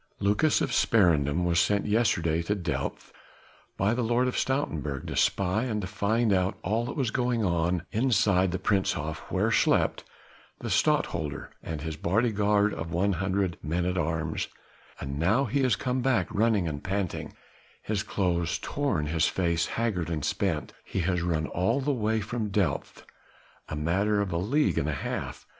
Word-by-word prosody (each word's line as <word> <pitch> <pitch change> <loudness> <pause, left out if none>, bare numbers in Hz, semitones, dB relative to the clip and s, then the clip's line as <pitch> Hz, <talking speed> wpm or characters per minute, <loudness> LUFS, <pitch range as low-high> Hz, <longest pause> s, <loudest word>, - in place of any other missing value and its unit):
Lucas 105 +10 +2
of - - 0
Sparendam 85 -9 +3
was 85 -1 +2
sent 100 +3 +2
yesterday 85 -7 +2
to 100 +5 -1
Delft 75 -8 -4 0.6
by 100 +4 +2
the 125 - -1
Lord 120 +2 +2
of 125 - -2
Stoutenburg 80 - -1
to - - -5
spy 100 +5 +1
and 110 -4 -1
to 100 - -3
find 110 +3 +1
out 95 0 +1
all 110 +5 0
that 125 - -5
was 130 -6 0
going 120 -3 0
on 85 0 0
inside 105 -6 +3
the 95 - -1
Prinzenhof 80 -7 0
where - - +1
slept - - +2 0.5
the - - -5
Stadtholder 75 -3 0
and 80 -2 -5
his 80 0 -4
bodyguard 105 +2 +2
of 85 +1 -5
one 95 +4 +1
hundred 95 0 -1
men 85 +4 -1
at 90 0 0
arms: 80 -2 -1 0.5
and 70 +1 -5
now 110 - +3
he 140 0 0
has 130 -5 +3
come 125 +5 -1
back 120 -9 +2
running 105 -4 +2
and 70 -2 -4
panting: 95 -2 -3 0.5
his 105 -2 -1
clothes 90 -5 0
torn, 135 - -1
his 80 +1 +1
face 85 -3 0
haggard 105 -8 -1
and 80 -4 -2
spent. - - -1
He 95 - -3
has 90 0 0
run 80 -2 0
all 95 +12 0
the 140 +1 0
way 110 -2 0
from 110 +1 -3
Delft 95 -8 -1 0.6
a - - -3
matter 95 +7 +1
of 100 -2 -1
a 85 - 0
league 140 - +1
and 75 - -1
a - - -1
half! 70 - -4
95 Hz, 170 wpm, -28 LUFS, 85-110 Hz, 0.6 s, Sparendam